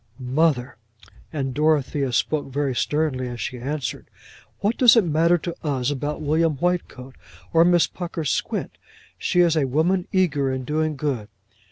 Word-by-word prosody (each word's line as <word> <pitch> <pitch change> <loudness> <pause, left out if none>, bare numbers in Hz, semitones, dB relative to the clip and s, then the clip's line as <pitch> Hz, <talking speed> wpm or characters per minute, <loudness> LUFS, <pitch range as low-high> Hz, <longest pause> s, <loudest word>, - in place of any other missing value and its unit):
"Mother!" 130 0 0 0.5
and 135 -4 -3
Dorothea 145 -2 +1
spoke 145 +4 0
very 140 0 -1
sternly 140 -1 -1
as 120 -1 -6
she 125 +1 -4
answered 140 +1 -4 0.5
"what 205 +4 0
does 245 -3 +7
it 230 - +5
matter 165 +2 +3
to 170 +1 -5
us 140 -3 -1
about 145 +2 -3
William 155 +1 +2
Whitecoat, 140 -6 -2 0.4
or 165 0 +6
Miss 175 -1 +4
Pucker's 165 -4 -4
squint? - - -3 0.4
She 180 - +2
is 170 -2 +3
a 150 -3 +2
woman 170 +7 +1
eager 150 -8 +1
in 130 0 -3
doing 155 +2 -1
good." 135 -7 -2
150 Hz, 155 wpm, -23 LUFS, 135-165 Hz, 0.5 s, does